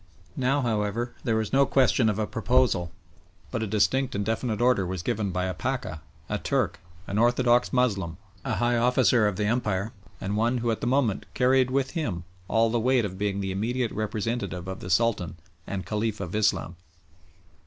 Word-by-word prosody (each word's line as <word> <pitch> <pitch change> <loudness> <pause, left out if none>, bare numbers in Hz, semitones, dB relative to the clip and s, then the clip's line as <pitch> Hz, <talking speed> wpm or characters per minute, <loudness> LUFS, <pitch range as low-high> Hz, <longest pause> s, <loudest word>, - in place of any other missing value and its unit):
Now, 135 0 +1
however, 115 0 -1
there 115 -4 +1
was 110 +1 -1
no 135 0 +5
question 120 -3 +3
of 105 - -1
a 110 - 0
proposal, 115 -7 +1 0.6
but - - -2
a 110 - -1
distinct 115 +6 +1
and 100 0 -1
definite 110 0 -1
order 120 -5 +3
was 90 -1 -4
given 100 +2 -1
by 90 0 -1
a 95 - -2
Pacha, - - -3 0.3
a - - -2
Turk, - - 0 0.3
an 100 +3 -2
orthodox 120 +1 +3
Moslem, 100 -10 0 0.3
a 110 - -1
high 120 +4 +1
officer 120 -2 +4
of 105 - -1
the 105 - -1
Empire, 105 -2 0 0.3
and 100 +2 -3
one 115 +4 +1
who 120 -1 0
at 110 - -3
the - - -1
moment 125 -6 +1
carried 130 0 +3
with 135 0 0
him 120 - -3 0.2
all 115 0 +2
the 120 - +1
weight 125 0 +2
of 95 -1 -6
being 100 -1 -1
the 95 -1 -2
immediate 115 +5 -1
representative 110 -3 -3
of 95 0 -5
the 90 - -7
Sultan 95 -2 +1 0.3
and 95 -1 -4
Caliph 110 0 -2
of 90 -3 -5
Islam. 105 -5 0
110 Hz, 185 wpm, -26 LUFS, 100-125 Hz, 0.6 s, no